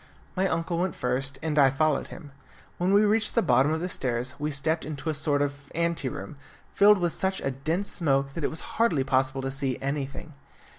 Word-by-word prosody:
My 190 +1 +2
uncle 165 -1 -1
went 185 -2 -1
first, 130 +2 -2
and 155 -2 +1
I 135 -1 +7
followed 150 +2 +1
him. 145 -4 -11 0.5
When 180 +2 +1
we 205 +2 +5
reached 215 +1 +2
the 230 - +3
bottom 140 +3 +3
of 160 0 -1
the 180 - -1
stairs 125 -6 -1
we 150 +1 -1
stepped 155 +3 -1
into 155 +1 -4
a - - -3
sort 145 -1 +1
of 140 0 -6
ante 170 -4 0
room, 100 +4 -8 0.4
filled 210 +1 +6
with 175 -3 0
such 190 0 0
a 135 - -1
dense 160 +9 -2
smoke 140 -5 +1
that 165 - -5
it - - +1
was 160 - -5 0.2
hardly 165 -13 +3
possible 130 0 0
to 135 - -2
see 135 -2 -2
anything. 140 +3 -4
150 Hz, 210 wpm, -27 LUFS, 135-170 Hz, 0.5 s, I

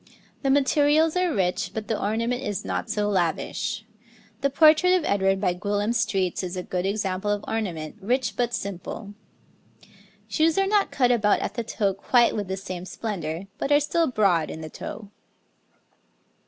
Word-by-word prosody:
The 275 - 0
materials 290 +4 +3
are 360 -1 +2
rich, 185 -4 0
but 220 -1 -4
the 220 - -1
ornament 230 +4 -1
is 205 -7 -3
not 230 - -3
so 210 -2 0
lavish; 190 +3 -1 0.6
the 280 - +2
portrait 310 +5 +5
of 360 - 0
Edward 195 -1 +2
by 185 -3 +1
Gwillim 205 +4 -1
Stretes 195 -6 0
is 180 0 -4
a 180 - -3
good 180 +1 -2
example 195 -1 -1
of 205 0 -1
ornament, 180 -6 -3
rich 240 +1 0
but 240 +1 0
simple. 200 +2 -6 1.1
Shoes 320 +1 +2
are 390 - +3
not 405 0 +2
cut 250 -3 +2
about 210 -4 +3
at - - -3
the 235 +1 -3
toe 200 -3 0
quite 235 +5 +3
with 205 -3 -3
the 190 +1 -3
same 185 -2 -6
splendour, 180 -6 -4 0.2
but 280 - -2
are 290 - +6
still 320 +3 +1
broad 195 -9 +2
in 160 - -7
the 155 -1 -8
toe. 205 -2 -8
210 Hz, 170 wpm, -25 LUFS, 190-260 Hz, 1.1 s, are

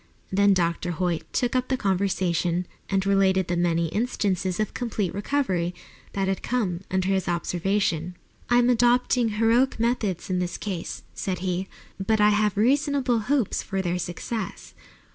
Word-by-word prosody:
Then 200 +1 +4
Dr. 175 0 0
Hoyt 170 0 -2
took 245 0 0
up 255 0 +1
the 260 - 0
conversation 185 -3 0 0.2
and 195 -1 +1
related 190 -2 +3
the 175 - 0
many 170 -1 +1
instances 195 -4 -1
of 215 - -1
complete 215 -7 -2
recovery 195 -6 -1 0.4
that 195 -1 0
had 190 0 -1
come 205 -9 -1
under 190 0 0
his 190 -1 +1
observation. 175 0 0 0.3
"I 240 - +5
am 245 0 +4
adopting 245 0 +3
heroic 235 +4 +3
methods 225 -6 0
in 185 -1 0
this 180 -1 -2
case," 185 -5 -5
said 185 -2 -3
he, 185 +1 -1 0.4
"but 220 +2 +2
I 210 0 +6
have 210 -1 +1
reasonable 270 +1 +2
hopes 245 0 0
of 195 0 0
their 180 0 -1
success. 190 +5 -5
195 Hz, 155 wpm, -25 LUFS, 180-230 Hz, 0.4 s, I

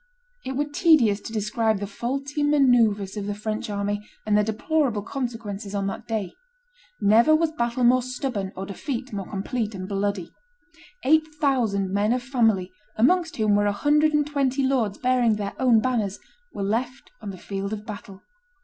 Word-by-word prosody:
It 265 - -4
were 285 +3 0
tedious 290 - +3
to - - -8
describe 220 0 0
the 205 - -3
faulty 275 +8 -3
manoeuvres 240 -9 +3
of 200 -1 -4
the 205 - -2
French 215 +1 -4
army 205 0 -2 0.2
and 210 -1 +2
their 210 - +4
deplorable 220 +1 0
consequences 220 -5 -5
on 200 -1 -1
that 195 - -5
day. 215 -5 -2 0.7
Never 230 +9 +5
was 320 0 +1
battle 240 -4 -1
more 250 +1 +5
stubborn 245 -6 -3
or 190 - -5
defeat 250 - -5
more 195 -2 -5
complete 215 +2 -3
and 185 -1 -6
bloody. 200 -3 -2 0.7
Eight 315 +3 +4
thousand 230 -10 +1
men 205 +3 +2
of 250 0 -2
family, 225 -8 +1 0.3
amongst 330 +9 +2
whom 215 -2 +2
were 205 0 +3
a - - +2
hundred 295 +8 +3
and 295 -1 +2
twenty 275 -2 0
lords 235 -7 0
bearing 250 -3 +2
their 200 -1 -4
own 240 -4 +4
banners, 220 -6 -1 0.3
were 200 - -4
left 240 +6 -2
on 210 - -6
the 190 - -7
field 195 +2 -5
of 215 -1 -5
battle. 200 -2 -9
225 Hz, 175 wpm, -24 LUFS, 205-265 Hz, 0.7 s, Never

